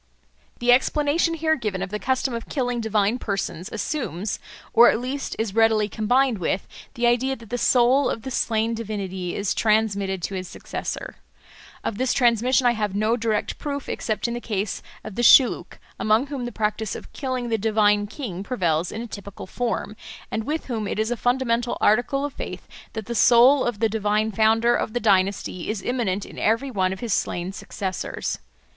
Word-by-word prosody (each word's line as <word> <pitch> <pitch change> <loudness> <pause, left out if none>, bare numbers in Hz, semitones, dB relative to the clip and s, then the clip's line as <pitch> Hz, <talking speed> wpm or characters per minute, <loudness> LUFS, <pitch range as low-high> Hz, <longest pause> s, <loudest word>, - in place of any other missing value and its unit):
The 240 0 +3
explanation 295 +6 +2
here 315 0 +2
given 210 -8 -3
of 195 - -6
the 210 - -3
custom 260 +1 0
of 230 -1 -5
killing 245 -4 -1
divine 220 +1 +1
persons 195 -5 -3
assumes, 210 - -3 0.3
or 240 +1 +8
at - - +1
least 265 +3 -4
is 220 -3 -2
readily 220 -1 +3
combined 240 +3 +1
with, 180 +2 -1 0.3
the 240 - 0
idea 245 +3 +2
that 230 -3 -15
the 245 - 0
soul 255 +3 +4
of 225 - -4
the 265 - -5
slain 225 -1 0
divinity 195 -5 -4
is 200 -1 0
transmitted 200 -4 +1
to 200 - -3
his 185 -1 -4
successor. - - -6 0.7
Of 210 - -3
this 260 0 +1
transmission 245 +1 +3
I 245 - +6
have 210 -4 -2
no 215 +3 +2
direct 220 -3 -1
proof 285 -2 -4
except 215 +1 -2
in 235 - -3
the 240 - -4
case 205 -3 -2 0.2
of 215 - -7
the 240 - -2
Shilluk, 245 +2 +5 0.2
among 215 +4 +3
whom 275 -4 -5
the 240 - -4
practice 215 -1 -2
of - - -10
killing 255 -3 -3
the 225 -1 0
divine 210 -1 +3
king 205 - -6
prevails 175 -7 0
in 225 - -5
a - - -7
typical 200 -2 -8
form, 230 0 -3 0.4
and 220 -1 -2
with 310 +3 -2
whom 225 -5 -3
it - - -3
is 220 +2 0
a - - +1
fundamental 245 -1 0
article 245 +6 +2
of 290 - -5
faith - - -7 0.3
that 220 -2 -5
the 235 - -4
soul 245 +4 +6
of 240 -3 -1
the 225 +2 +2
divine 215 0 0
founder 225 +3 +3
of 220 - -2
the 245 - 0
dynasty 195 -4 +1
is 215 -2 -3
immanent 210 -6 -1
in - - -10
every 230 +6 +1
one 190 -4 +1
of 190 - -6
his 235 -5 -1
slain 175 +2 -1
successors. 190 -1 -4
225 Hz, 190 wpm, -24 LUFS, 205-245 Hz, 0.7 s, or